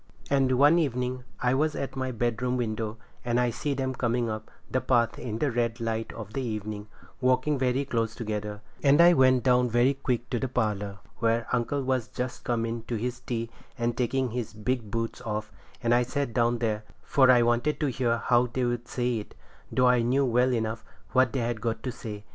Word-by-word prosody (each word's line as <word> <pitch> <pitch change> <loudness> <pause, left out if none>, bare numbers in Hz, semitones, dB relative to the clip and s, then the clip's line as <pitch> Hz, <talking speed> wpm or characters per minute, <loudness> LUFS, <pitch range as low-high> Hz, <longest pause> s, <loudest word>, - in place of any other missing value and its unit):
And 135 -2 +3
one 145 +6 +5
evening 125 -3 -1 0.2
I 125 +1 +2
was 150 +3 +1
at 135 -1 -4
my 130 -1 -2
bedroom 120 +1 -1
window, 110 -2 -2 0.3
and 120 0 +1
I 125 -1 +2
see 140 +4 -2
them 130 -1 -1
coming 120 -2 0
up 110 0 -6 0.2
the 130 - 0
path 120 -2 +2
in 110 -3 -4
the 140 +3 0
red 115 -1 -1
light 115 -1 -2
of 110 -2 -8
the 135 - -2
evening, 105 -3 -4 0.3
walking 130 +3 +2
very 130 +2 +1
close 115 -4 -1
together, 105 -2 -4 0.2
and 140 +1 +5
I 175 +1 +8
went 130 -3 +4
down 125 -1 +4
very 120 +4 +3
quick 125 -3 -2
to 120 - 0
the 130 - -1
parlour, 105 -5 -1 0.2
where 115 0 +1
uncle 130 +3 0
was 130 -3 0
just 125 0 -5
come 115 -2 0
in 115 0 -3
to 115 - -3
his 125 +3 -3
tea 115 -2 -4 0.3
and 120 -1 0
taking 125 0 0
his 115 -2 -4
big 110 +1 -2
boots 115 +1 -3
off, 105 -1 -4 0.3
and 120 0 +3
I 120 - +5
sat 130 0 -2
down 120 0 +2
there, 110 -2 -1 0.2
for 130 -2 +4
I 125 -2 +7
wanted 120 +5 +1
to 145 -3 +1
hear 120 -1 +1
how 120 +1 +3
they'd 120 -1 -2
say 125 -2 -1
it, 105 - -10 0.4
though 125 -1 +3
I 125 -1 +4
knew 130 +4 +2
well 125 +1 +3
enough 110 -1 -1 0.3
what 130 -2 +4
they 130 - -1
had 115 -1 -2
got 115 -1 -2
to 130 - -2
say. 105 -3 -7
120 Hz, 205 wpm, -27 LUFS, 115-130 Hz, 0.4 s, I